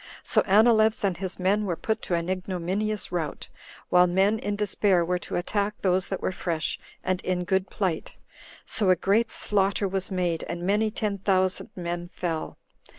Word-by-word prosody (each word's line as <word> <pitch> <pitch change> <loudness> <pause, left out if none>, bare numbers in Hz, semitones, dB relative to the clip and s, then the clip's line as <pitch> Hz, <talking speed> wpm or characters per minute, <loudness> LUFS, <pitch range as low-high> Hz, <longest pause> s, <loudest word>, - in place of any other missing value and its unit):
So - - +3
Anileus 220 +2 +4
and 195 -3 +1
his 190 +1 -4
men 195 +3 +1
were 175 - 0
put 220 +5 -2
to 175 - -1
an 170 0 -2
ignominious 185 +3 -2
rout, 165 -4 -3 0.4
while 180 0 +5
men 195 +5 +2
in 205 -1 -2
despair 200 -3 +2
were 180 +1 0
to - - -6
attack 205 +3 -1
those 185 -1 +2
that 190 - -4
were - - 0
fresh 170 -3 -2 0.2
and 185 0 -1
in 180 -1 -1
good 190 +1 0
plight; 185 -6 -3 0.5
so 205 -6 +1
a 185 - +6
great 210 +6 +1
slaughter 200 0 +1
was 190 0 -2
made, 180 -4 -1
and 170 0 -5
many 210 +4 +2
ten 210 -2 -2
thousand 185 -1 +1
men 175 -1 -4
fell. 165 -3 -3
190 Hz, 175 wpm, -26 LUFS, 180-205 Hz, 0.5 s, a